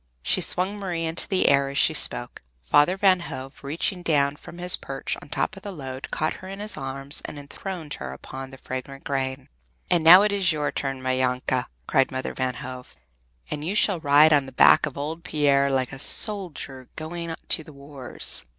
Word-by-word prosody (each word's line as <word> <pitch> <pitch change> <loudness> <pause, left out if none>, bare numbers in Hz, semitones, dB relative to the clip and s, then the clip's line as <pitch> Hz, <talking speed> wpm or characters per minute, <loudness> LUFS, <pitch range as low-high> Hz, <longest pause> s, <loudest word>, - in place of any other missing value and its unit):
She - - +1
swung 190 +3 +3
Marie 175 -4 -3
into 165 +1 -2
the 190 -2 +2
air 140 0 +3
as 140 - -5
she - - +3
spoke. - - 0 0.2
Father 145 - +3
Van 190 -2 +4
Hove 135 -5 -8
reached 170 +5 -2
down 145 -3 +2
from 170 - -13
his 180 0 +2
perch 135 0 -4
on - - -14
top 215 - -2
of 195 - -11
the 200 0 -7
load, 135 -6 -7
caught 155 - -2
her 185 - -9
in 195 +1 -7
his 210 +1 -4
arms, 135 +1 -4
and - - -7
enthroned 155 +2 -7
her 65 -1 -6
upon 130 - -8
the 135 - -12
fragrant 130 +1 -7
grain. 130 -1 -3 0.4
"And 170 -2 +3
now 180 +5 +9
it 210 - +2
is 195 -4 +1
your 150 -2 -1
turn, 135 -2 -4
my 130 0 0
Janke!" 125 0 0 0.2
cried 135 -3 +2
Mother 130 0 -4
Van 130 -1 -2
Hove, 130 -2 -9 0.6
"and 150 - -4
you 185 +6 -2
shall 200 -4 +2
ride 150 +1 +6
on 140 -2 +3
the - - -9
back 130 - +6
of 145 - -8
old 155 +4 -5
Pier 140 -2 +2
like 130 -1 -1
a 135 - -7
soldier 155 - +2
going 165 +1 -5
to 160 - +2
the 155 - -13
wars!" 140 -2 -7
145 Hz, 205 wpm, -24 LUFS, 135-170 Hz, 0.6 s, now